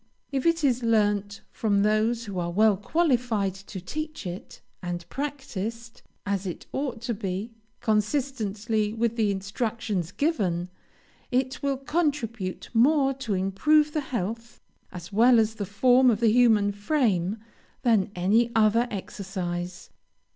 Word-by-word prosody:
If 270 +2 0
it 335 -1 +2
is 255 -3 +2
learned 205 -3 +1
from 200 -3 +1
those 220 +2 +1
who 195 -3 -4
are 175 0 -2
well 210 +4 +4
qualified 235 - +1
to 195 0 -9
teach 310 - -6
it, 180 +1 -7 0.2
and 175 -1 -5
practised, 235 -5 -5 0.2
as 200 -1 -1
it 175 - -6
ought 260 -5 -3
to 235 - -1
be, 200 +1 -4 0.3
consistently 220 -2 0
with 230 0 0
the 220 -3 +2
instructions 200 -2 -2
given, 190 - 0 0.6
it 260 +1 -1
will 275 -1 0
contribute 270 - -2
more 270 +3 +4
to 245 -6 -3
improve 295 +12 +2
the 305 - 0
health, 230 -1 -4 0.3
as 180 +2 -9
well 235 +3 +6
as 220 0 +2
the 205 -3 -5
form 250 +6 +4
of 215 -3 +2
the 230 -2 +4
human 220 -4 +4
frame, 205 - 0 0.5
than 225 -6 +3
any 215 +7 +2
other 225 +2 +4
exercise. 185 -3 -5
220 Hz, 135 wpm, -26 LUFS, 200-250 Hz, 0.6 s, well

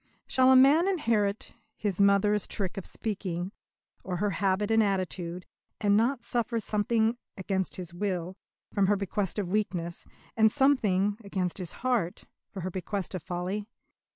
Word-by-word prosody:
Shall 260 0 +4
a - - +7
man 285 +7 +6
inherit 225 - 0 0.2
his 200 -3 -1
mother's 200 +1 +3
trick 190 -3 -3
of 195 - -6
speaking, 185 -4 -3 0.5
or 180 -2 -3
her 205 +3 0
habit 195 +2 0
and 225 0 +5
attitude, 185 -3 -2 0.3
and 205 -1 +3
not 235 +3 +2
suffer 235 -1 -1
something, 220 +2 +1 0.2
against 190 -1 -2
his 175 -2 -7
will, 180 -1 -2 0.4
from 200 -2 +3
her 205 - +4
bequest 200 0 -2
of 200 -4 -2
weakness, 180 -4 -2 0.3
and 220 -1 +5
something, 210 -8 +2
against 190 -2 -2
his 180 -3 -5
heart, 230 -9 0 0.3
from 190 -4 -7
her 185 - -3
bequest 190 +2 -3
of 185 - -3
folly? 185 +5 -3
200 Hz, 155 wpm, -28 LUFS, 185-220 Hz, 0.5 s, a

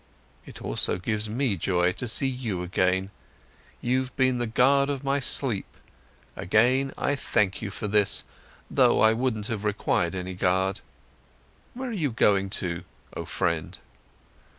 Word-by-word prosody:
"It - - -10
also - - 0
gives 105 +3 -2
me 120 -1 0
joy, 90 +1 +1
to 125 +6 -4
see 120 +4 +1
you 120 -9 -3
again. 95 +2 0 0.7
You've 130 +1 -1
been 130 -2 +2
the 120 - -1
guard 140 +5 +3
of 140 -1 -3
my 140 +1 +1
sleep, 130 -5 +1 0.6
again 130 +8 +2
I 145 - 0
thank 105 -7 0
you 110 - -4
for 105 +1 -5
this, 105 -1 +2 0.4
though - - +3
I 110 0 +5
wouldn't 115 -3 -1
have 110 -2 -3
required 95 -4 0
any 95 0 -4
guard. 95 +1 +1 1.0
Where 260 0 -4
are - - -4
you 160 -9 0
going 100 -4 +2 0.2
to, 85 -1 -3 0.3
oh - - -4
friend?" 85 -2 -2
110 Hz, 150 wpm, -26 LUFS, 95-130 Hz, 1.0 s, I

